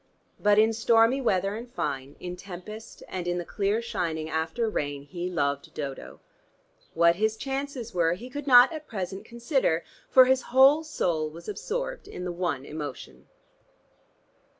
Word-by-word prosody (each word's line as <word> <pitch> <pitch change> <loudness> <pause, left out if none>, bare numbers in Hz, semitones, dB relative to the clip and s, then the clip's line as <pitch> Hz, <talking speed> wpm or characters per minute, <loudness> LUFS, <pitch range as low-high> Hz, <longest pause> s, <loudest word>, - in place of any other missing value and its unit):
But 205 0 +4
in 220 +1 +5
stormy 230 +3 +4
weather 195 -4 +1
and 235 +2 -8
fine, 140 - -4
in 180 0 -6
tempest 200 +4 -10
and 180 -2 -5
in 175 0 0
the 175 - -3
clear 205 +5 0
shining 160 -8 -3
after 160 +9 -1
rain, 145 -9 -3
he 175 +5 -5
loved 140 -5 -1
Dodo. 140 -3 -6 0.7
What 170 +1 +4
his 220 +1 +1
chances 270 -3 -4
were 170 -2 +2
he 220 +8 -8
could 290 +2 -7
not 250 +3 +8
at 310 -1 -7
present 190 -2 -5
consider, 235 - 0 0.3
for 260 -1 +8
his 260 0 +3
whole 270 +5 +6
soul 170 - -1
was 165 +2 -12
absorbed - - -4
in 180 - -7
the 180 - -2
one 170 -6 -2
emotion. 150 -3 -8
195 Hz, 155 wpm, -27 LUFS, 165-245 Hz, 0.7 s, not